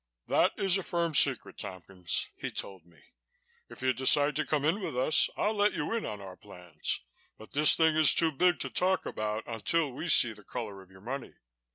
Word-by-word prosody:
"That - - +2
is 195 0 +2
a - - -3
firm 170 -2 -2
secret, 135 -3 +2
Tompkins," 95 -3 -3
he - - -5
told 95 -4 -5
me. 85 -4 -23 0.7
"If - - -10
you 130 0 +2
decide 145 +3 +3
to 155 - 0
come 150 -2 0
in 170 +7 +1
with 155 -9 -5
us, 140 +5 +4
I'll 215 - 0
let 205 0 +2
you 150 +6 -3
in 230 - -2
on 105 - -6
our 95 -2 -10
plans, 90 -5 -5 0.4
but 110 - -14
this 150 +1 +4
thing 160 -1 +3
is 155 -2 +5
too 165 -1 +3
big 175 +1 +2
to 135 - -4
talk 185 +9 +1
about 110 +1 -3
until 140 +7 -1
we 160 +7 -6
see 120 -6 +5
the 105 - -17
color 105 -4 -7
of 95 - -18
your 95 0 -17
money." 130 +5 -6
130 Hz, 210 wpm, -29 LUFS, 105-160 Hz, 0.7 s, is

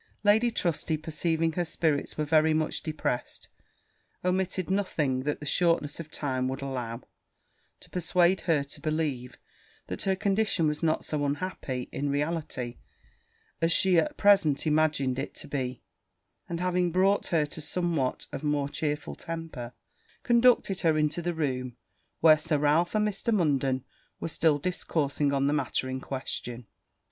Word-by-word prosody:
Lady 215 +3 +5
Trusty 170 -6 0
perceiving 160 +1 -1
her 175 +2 -1
spirits 160 -3 -1
were 155 - 0
very 155 +1 +4
much 155 0 -1
depressed, 155 -6 -3 0.8
omitted 185 0 0
nothing, 155 -9 0
that 150 - -1
the 150 - -8
shortness 165 -1 +1
of 160 -2 -7
time 130 -4 -2
would 135 +2 -4
allow, 125 -3 -4 0.8
to - - -14
persuade 180 +1 +2
her 150 -4 +3
to 140 - -10
believe, 155 -6 -2 0.5
that - - -5
her 190 -1 +1
condition 195 -3 +1
was 150 0 -1
not 160 -2 +1
so 150 -2 -2
unhappy, 140 -4 -3
in 145 +1 -2
reality, 145 -4 -2 0.8
as 165 0 +3
she 180 0 +5
at 300 - -1
present 195 -9 +4
imagined 150 -4 +2
it 140 - -5
to - - -9
be; 130 -3 -3 0.7
and 170 -1 -3
having 180 -1 +1
brought 190 +3 +2
her 160 -3 +2
to 155 +2 -8
somewhat 160 -4 -1
of - - -5
a 150 - -2
more 145 -1 0
chearful 150 0 -3
temper, 165 -8 -6 0.5
conducted 235 -5 +4
her 160 -2 +3
into 150 +2 +1
the 175 0 -2
room 130 -5 -2 0.4
where 155 -1 +7
Sir 155 -1 +1
Ralph 150 +6 +2
and 210 0 +3
Mr. 210 +3 -2
Munden 140 - +1 0.3
were - - -3
still 155 -2 +2
discoursing 145 -3 -1
on 140 0 +1
the 145 - +2
matter 145 -3 0
in 130 0 -4
question. 125 -3 -5
155 Hz, 155 wpm, -28 LUFS, 140-175 Hz, 0.8 s, where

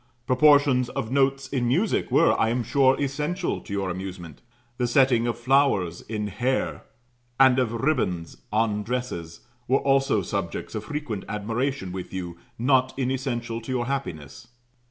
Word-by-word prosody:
Proportions 140 -2 +4
of 110 - -4
notes 135 0 +1
in 125 -3 -1
music 180 - +1
were, 165 - +4
I 110 - +3
am 120 +1 0
sure, 135 +2 +3
essential 150 +6 -2
to - - -12
your 100 -2 -1
amusement; 90 -3 -7 0.4
the 125 - +1
setting 120 -2 +3
of 120 - -1
flowers 120 - +2
in 105 -1 -4
hair, 120 +6 -2 0.5
and 130 -1 +6
of 125 -3 +1
ribands 115 - -1
on 105 -1 +1
dresses, 105 -9 -4 0.3
were 130 - +4
also 135 -7 +2
subjects - - -4
of - - -4
frequent 145 -9 -4
admiration 110 0 -2
with 90 -1 -6
you, 90 -2 -5 0.2
not 130 +1 +2
inessential 125 -3 -2
to 125 - -7
your 125 -2 0
happiness. 120 - -5
125 Hz, 150 wpm, -25 LUFS, 105-135 Hz, 0.5 s, and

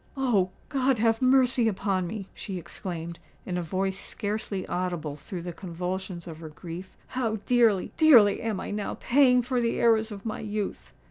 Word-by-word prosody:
"Oh! 225 -9 +2 0.2
God 270 -2 +2
have 225 +1 +2
mercy 255 -2 +4
upon 190 -3 0
me!" 195 +1 -5
she 190 -3 -6
exclaimed, 170 -1 -6 0.3
in 180 - -3
a 180 - 0
voice 190 +3 -2
scarcely 205 -2 -3
audible 175 -5 -2
through 170 +4 -7
the 175 0 -5
convulsions 180 0 -5
of 160 -3 -8
her 160 -1 -8
grief: 170 +4 -9
"how 235 -4 -1
dearly—dearly 235 - +5
am 220 -4 -2
I - - -5
now 205 0 -3
paying 250 -1 +4
for 250 0 0
the 230 -1 0
errors 225 -1 +3
of 200 0 -8
my 220 - -3
youth!" 210 -1 -4
200 Hz, 170 wpm, -27 LUFS, 180-230 Hz, 0.3 s, dearly—dearly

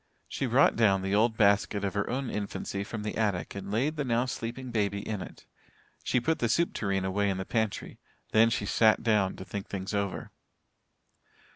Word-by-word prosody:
She 135 - -2
brought 125 +4 +4
down 100 -4 +3
the 95 +1 -1
old 110 +2 +3
basket 100 0 +3
of 95 - -2
her 105 0 -1
own 130 0 -2
infancy 100 -1 -3
from 105 0 -6
the 105 - -3
attic 100 -5 -1
and 100 0 -7
laid 135 +9 0
the 145 - 0
now 120 -1 +1
sleeping 125 0 -5
baby 100 -3 -1
in 105 -3 -3
it. - - -10 0.6
She - - +1
put 160 +7 0
the 120 - +1
soup 170 +8 +2
tureen 95 -2 -1
away 100 +2 +1
in 95 - -1
the 95 - -4
pantry. 110 -2 -2 0.3
Then 115 +1 +5
she 105 -2 -1
sat 110 +2 +3
down 105 -4 +2
to 95 - -9
think 100 0 -6
things 95 +1 -5
over. 100 -2 -2
105 Hz, 195 wpm, -29 LUFS, 100-115 Hz, 0.6 s, Then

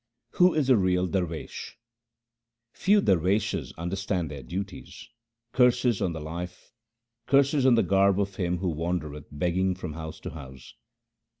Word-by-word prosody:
Who 180 -1 +4
is 150 -4 +1
a 125 - +6
real 90 -2 +2
darwesh: 90 -4 -4 0.4
— 115 0 -61 0.3
Few 205 +1 +3
darweshes 95 - +1
understand 90 -1 -2
their 70 -2 -7
duties. 95 +9 -7 0.5
Curses 125 -3 +3
on 90 - +1
the 80 - -5
life, 85 +7 -7 0.5
curses 140 0 +4
on 125 - +6
the 115 - +3
garb 100 0 +3
of 100 -1 -2
him 90 -1 0
who 90 +1 -1
wan 85 +3 -1
dereth 75 -2 -9
begging 90 +5 0
from 90 -4 -6
house 80 0 -7
to - - -6
house 65 -4 -11
90 Hz, 155 wpm, -27 LUFS, 80-105 Hz, 0.5 s, a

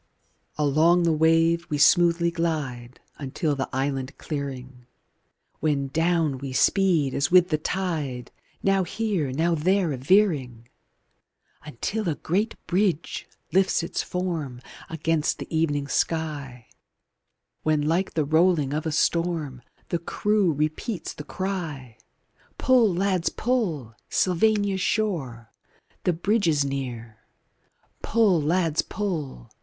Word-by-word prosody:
V 150 - 0
Along 160 +5 +4
the 165 - +3
wave 165 +2 +3
we 150 - -1
smoothly 170 +3 +4
glide 145 -8 -3 0.2
Until 145 +2 -2
the 135 - -3
island 135 0 -2
clearing, 130 -4 -6 0.7
When 140 -3 0
down 160 -2 +1
we 135 -1 -6
speed 165 -4 +2
as 140 - 0
with 180 0 +5
the 155 -3 0
tide, 155 -8 -3 0.3
Now 195 -1 +3
here, 185 -7 -2
now 165 +6 +1
there 180 +2 +1
a - - -4
veering, 135 - +1 1.0
Until 170 - -3
a 155 - -1
great 200 +10 -1
bridge 180 -3 -1 0.3
lifts 190 -2 +3
its 170 - -2
form 165 -9 -3 0.3
Against 160 -1 0
the - - -6
evening 145 -3 0
sky, 145 -7 -2 1.0
When 155 -1 +1
like 170 +5 0
the 155 -3 +1
rolling 160 -2 +2
of 155 +2 -2
a - - -1
storm 160 -5 0 0.3
The 170 - -1
crew 205 +2 +1
repeats 155 +6 -3
the 150 - -8
cry: 155 - -5 0.6
Pull, 250 -6 +4
lads, 185 -1 0
pull! 180 - -1 0.2
Sylvania's 200 +1 +1
shore! 140 - -2 0.5
The 180 - +3
Bridge 200 +5 +1
is 145 -3 +2
near! 120 -5 -5 0.8
Pull, 210 -7 +3
lads, 165 0 +1
pull! 160 - -5
160 Hz, 120 wpm, -25 LUFS, 140-180 Hz, 1.0 s, with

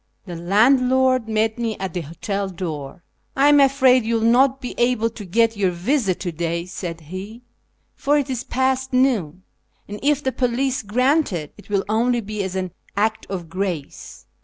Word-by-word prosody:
The 175 -3 -7
landlord 250 +6 +3
met 220 +1 0
me 225 -2 -2
at 190 -3 -5
the 180 - -2
hotel 195 +6 -4
door. 165 -3 -6 0.2
" - - -45
I 280 +2 +5
am 290 0 +6
afraid 265 -2 +5
you 230 +1 0
will 225 - 0
not 265 +2 +4
be 250 - -6
able 240 -2 +2
to 215 - -9
get 225 +5 +2
your 200 -2 +1
visa 190 +3 0
to 175 -1 -4
day," 170 +1 -3
said 170 -2 -6
he, 190 +9 -8 0.3
" - - -46
for 290 +1 +1
it 285 -2 0
is 255 -3 -3
past 260 0 -1
noon, 210 - +1 0.4
and 205 +1 -7
if 290 0 +1
the 260 - 0
police 255 +1 0
grant 255 +8 +1
it, 155 -5 -5
it 205 - -17
will 200 -1 0
only 235 +3 +1
be 210 -1 -4
as 190 -1 -4
an 185 -1 -3 0.3
act 220 +1 0
of 180 -4 -5
grace. 180 -5 -5
220 Hz, 190 wpm, -21 LUFS, 185-255 Hz, 0.4 s, am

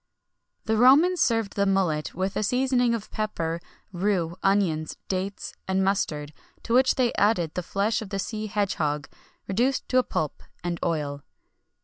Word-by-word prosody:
The 220 0 +1
Romans 295 +10 +6
served 225 -4 +1
the 200 0 +2
mullet 180 -6 0
with 190 +2 -2
a - - 0
seasoning 250 +1 +2
of 215 -2 -7
pepper, 170 -6 -2 0.3
rue, 175 -2 0
onions, 180 -6 +1
dates, 195 +1 -3
and 190 0 +1
mustard, 155 -6 -1 0.3
to 230 - -2
which 260 +1 +5
they 250 -3 +2
added 190 -7 +2
the 180 - -2
flesh 200 +5 0
of 215 - -7
the 195 - -3
sea 215 +2 -3
hedge 205 -1 0
hog 145 -1 -1 0.4
reduced 245 +7 0
to 255 - +4
a - - +2
pulp, 155 - -3 0.2
and 175 -1 -2
oil. 145 -4 -1
195 Hz, 160 wpm, -26 LUFS, 170-225 Hz, 0.4 s, Romans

